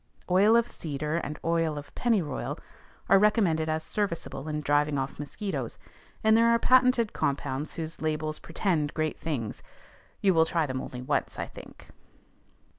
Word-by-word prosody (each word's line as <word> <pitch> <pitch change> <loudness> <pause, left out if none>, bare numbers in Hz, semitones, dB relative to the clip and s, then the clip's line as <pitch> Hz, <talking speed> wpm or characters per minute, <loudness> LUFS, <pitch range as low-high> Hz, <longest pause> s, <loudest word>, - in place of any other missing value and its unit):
Oil 200 +5 +6
of 235 0 +4
cedar 150 +1 -3
and 150 -2 -4
oil 165 -2 +1
of 145 0 -9
pennyroyal 195 - 0 0.5
are 195 - +6
recommended 190 -7 +3
as 155 0 -1
serviceable 170 -8 -3
in 150 -1 -2
driving 145 0 +2
off 135 +1 -3
mosquitoes, 145 - -4 0.5
and 220 0 +5
there 230 +1 +5
are 235 - +5
patented 250 -2 +4
compounds 140 +1 -2
whose 165 0 -5
labels 155 0 -1
pretend 165 -4 -1
great 155 -1 -1
things: 130 -10 -3 0.6
you 195 -2 +3
will 160 -1 +4
try 165 -2 +1
them 130 -2 -3
only 125 0 -7
once, - - -1
I - - -2
think. - - -13
160 Hz, 155 wpm, -28 LUFS, 145-200 Hz, 0.6 s, Oil